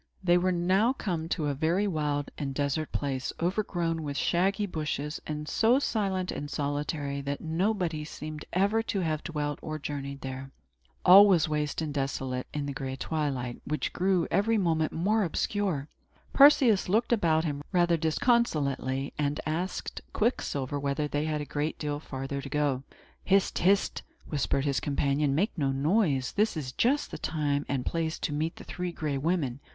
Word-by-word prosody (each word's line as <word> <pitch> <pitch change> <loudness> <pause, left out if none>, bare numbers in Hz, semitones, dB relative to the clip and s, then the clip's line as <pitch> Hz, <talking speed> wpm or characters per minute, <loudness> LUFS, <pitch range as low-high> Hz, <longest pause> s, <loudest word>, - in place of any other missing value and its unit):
They 175 -1 +4
were 185 +1 +1
now 185 +7 +2
come 170 -10 -3
to 160 -3 -1
a 145 - 0
very 165 +8 +1
wild 150 -6 -1
and 135 -2 -4
desert 145 +2 -1
place, 135 -3 -2
overgrown 175 -3 -1
with 145 -2 -4
shaggy 195 +4 +1
bushes, 150 -4 -3
and 150 0 -4
so 225 - +3
silent 195 -8 -1
and 145 - -5
solitary 145 -1 -2
that 140 +1 -3
nobody 170 -1 -1
seemed 150 0 -7
ever 200 +4 +2
to 210 -3 -2
have 155 -3 -1
dwelt 150 -3 -3
or 155 0 -4
journeyed 140 -1 -5
there. 135 0 -6 0.6
All 195 +3 +10
was 175 -6 +4
waste 150 0 -1
and 150 -2 -3
desolate, 135 -2 -2
in 145 -1 -3
the 140 - -3
gray 135 -1 -4
twilight, 135 -4 -2
which 150 +2 -2
grew 185 -1 +1
every 225 +3 +2
moment 160 -5 +1
more 210 +7 +1
obscure. 180 -3 -1 0.5
Perseus 265 -9 +6
looked 225 +5 +2
about 160 -7 +2
him, 145 -2 -2
rather 175 -2 +3
disconsolately, 150 - +1
and 145 0 0
asked 170 +5 -3
Quicksilver 145 - -1
whether 140 +1 -1
they 145 +1 -1
had 155 -1 -1
a - - -4
great 145 +3 -2
deal 145 -1 -3
farther 135 -1 -5
to 140 - -7
go. 145 -3 0 0.4
"Hist! 195 0 +2
hist!" 195 +3 +2 0.3
whispered 140 -1 0
his 140 -3 +1
companion. 140 0 +1
"Make 200 +9 +1
no 135 -2 +1
noise! 140 - +1
This 210 -3 +1
is 135 -5 -4
just 270 - +1
the - - -6
time 145 -2 -1
and 130 -2 -1
place 165 -1 -1
to 150 - -3
meet 155 +3 -1
the - - -11
Three 180 0 -4
Gray 150 -4 -2
Women. 145 -5 0
155 Hz, 170 wpm, -29 LUFS, 140-185 Hz, 0.6 s, All